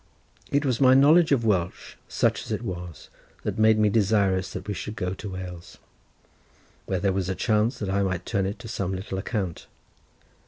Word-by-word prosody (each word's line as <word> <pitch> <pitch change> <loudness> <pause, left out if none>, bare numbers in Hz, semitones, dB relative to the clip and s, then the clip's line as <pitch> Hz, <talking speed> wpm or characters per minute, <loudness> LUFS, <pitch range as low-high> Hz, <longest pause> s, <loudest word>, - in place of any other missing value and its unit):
It 140 +1 +1
was 130 -3 0
my 130 -1 +7
knowledge 155 +5 +6
of 125 -5 +2
Welsh, 90 -5 -1
such - - +1
as - - -9
it - - -2
was, 90 -4 -7 0.3
that - - -3
made 110 0 +5
me 105 0 +4
desirous 100 -3 +2
that 95 +2 -7
we 105 - -2
should 105 +2 -6
go 90 -2 -2
to 100 +1 -7
Wales, 90 -2 -8 1.1
where 95 - -1
there 95 +1 +1
was 95 -1 -1
a 95 - -1
chance 110 +5 +1
that 105 - -4
I 100 +1 +1
might 95 -2 -2
turn 100 -4 0
it 100 - -4
to 115 - -10
some 95 -4 -3
little 95 0 -5
account. 95 -5 -4
100 Hz, 195 wpm, -25 LUFS, 95-110 Hz, 1.1 s, my